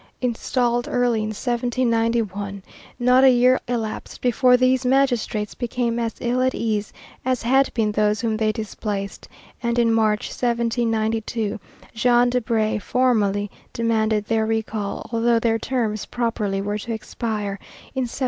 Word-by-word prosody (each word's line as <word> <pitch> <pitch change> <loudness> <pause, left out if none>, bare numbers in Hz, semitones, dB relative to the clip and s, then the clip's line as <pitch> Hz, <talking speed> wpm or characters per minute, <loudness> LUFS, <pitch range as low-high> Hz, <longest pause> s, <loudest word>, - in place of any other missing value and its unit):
Installed 240 0 0
early 245 -4 +1
in 215 - -2
1791, 230 -4 -1 0.3
not 250 +1 +4
a 265 - +8
year 250 +1 +4
elapsed 225 -3 -4
before 250 +1 +4
these 255 +1 +2
magistrates 250 -5 +1
became 240 -1 -2
as 230 -1 -2
ill 245 +1 0
at 260 0 +1
ease 215 -2 -1 0.3
as 255 -1 0
had 265 +3 +3
been 220 -3 +1
those 210 0 +1
whom 225 -2 0
they 215 0 +1
displaced, 205 -2 -5 0.3
and 235 0 -1
in 230 -1 +3
March, 215 -2 +1
1792, 225 -2 -1 0.3
Jean 240 +2 +3
Debry 225 -3 0
formally 205 -6 +1 0.2
demanded 220 -2 +1
their 220 0 +1
recall, 220 -2 -3
although 230 0 +2
their 225 0 +1
terms 225 -4 -2
properly 210 -5 -1
were 205 +1 -2
to 235 +3 -6
expire 215 -2 -3 0.3
in 260 -2 -1
1796. - - -8
230 Hz, 140 wpm, -22 LUFS, 215-245 Hz, 0.3 s, a